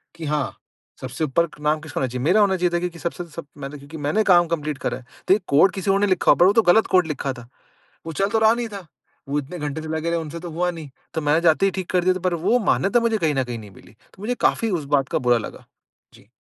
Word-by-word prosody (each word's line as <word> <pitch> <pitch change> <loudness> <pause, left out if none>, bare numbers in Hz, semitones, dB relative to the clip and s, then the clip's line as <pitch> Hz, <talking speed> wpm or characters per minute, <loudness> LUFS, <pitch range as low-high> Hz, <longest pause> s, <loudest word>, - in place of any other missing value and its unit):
कि 165 -1 -7
हाँ, 150 -1 -2 0.4
सबसे 130 +4 -4
ऊपर 155 +3 +1
नाम 150 +1 +1
किसका 155 -3 -6
होना 130 - +1
चाहिए? 125 0 -5
मेरा 190 +7 +4
होना 195 -2 +3
चाहिए 180 0 +1
था 175 - +2
क्योंकि 170 -1 -5
सबसे 170 +2 -4
सब 165 - -6
मैंने 140 +1 -7
क्योंकि 145 +3 -11
मैंने 215 +9 +2
काम 175 -4 +5
कंप्लीट 150 -3 -3
करा - - -1
है। 125 - -15 0.2
तो - - +6
ये 205 - +2
कोड 150 +7 +5
किसी 195 0 -1
और 195 - +2
ने 205 - +2
लिखा 185 -3 +3
होगा - - +3
पर - - +7
वो 195 - +5
तो 225 - +5
गलत 220 +4 +4
कोड 180 -3 +3
लिखा 140 -3 -3
था। 120 -2 -12 0.6
वो 165 - -5
चल 195 +6 +1
तो 225 - +1
रहा 220 0 +5
नहीं 235 0 -3
था, 200 -3 -8 0.4
वो 145 +1 0
इतने 150 +5 -7
घंटे 150 +1 -4
से 160 - -7
लगे 160 +1 -2
रहे 170 0 0
उनसे 160 +1 -6
तो 175 0 -7
हुआ 175 +3 0
नहीं, 160 -4 -9 0.2
तो 160 - -2
मैंने 150 +2 +2
जाते 170 +3 +4
ही 195 - +2
ठीक 185 0 -5
कर 180 -1 +2
दिया 185 +1 +3
था - - -3
पर - - -4
वो 240 +4 +4
मान्यता 200 +5 +3
मुझे 230 -1 +1
कहीं 160 -7 0
न 135 - +1
कहीं 120 -2 -6
नहीं 105 -2 -12
मिली। - - -17 0.2
तो 190 - -17
मुझे 245 +3 -1
काफ़ी 225 - +2
उस 170 -7 -2
बात 135 -1 0
का - - 0
बुरा 120 -1 +3
लगा। 115 - -8 0.5
जी। - - -19
165 Hz, 290 wpm, -22 LUFS, 145-190 Hz, 0.6 s, पर